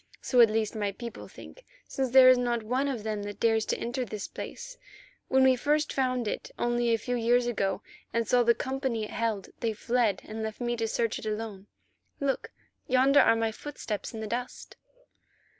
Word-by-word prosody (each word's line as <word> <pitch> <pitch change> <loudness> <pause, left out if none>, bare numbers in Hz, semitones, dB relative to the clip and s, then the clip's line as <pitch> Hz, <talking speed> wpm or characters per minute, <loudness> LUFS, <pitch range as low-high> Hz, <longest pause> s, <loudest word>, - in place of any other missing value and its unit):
So 250 -2 +3
at 230 - +7
least 215 -1 0
my 205 -2 -1
people 235 +2 -8
think, - - -13 0.2
since 265 -1 -2
there 260 +1 +8
is 255 0 +8
not 240 -2 0
one 255 +5 0
of 250 -6 -3
them 215 -1 -2
that 205 0 -7
dares 225 -1 +2
to - - 0
enter 245 +2 -3
this 210 -3 -5
place. - - -8 0.5
When 265 0 +4
first 295 +4 +1
we - - -8
found 255 -3 0
it - - -4
only 240 0 +1
a 230 - +3
few 245 +3 -3
years 240 +1 +2
ago 200 -4 -1 0.3
and 230 -1 0
saw 250 +2 +4
the 235 0 +4
company 265 -4 -2
it 210 - -6
held, 220 -3 -2
they 230 -2 -1
fled, 230 -3 0
and 220 +1 -6
left 220 -1 -5
me 240 -1 -1
to 225 -1 -1
search 230 0 -1
it - - -7
alone. 210 -2 -5 0.5
Look, 275 -1 -1 0.4
yonder 265 +3 +5
are - - +5
my 225 0 0
footsteps 220 -4 -6
in 220 -2 -6
the - - -3
dust." 245 +3 -5
235 Hz, 200 wpm, -28 LUFS, 220-255 Hz, 0.5 s, there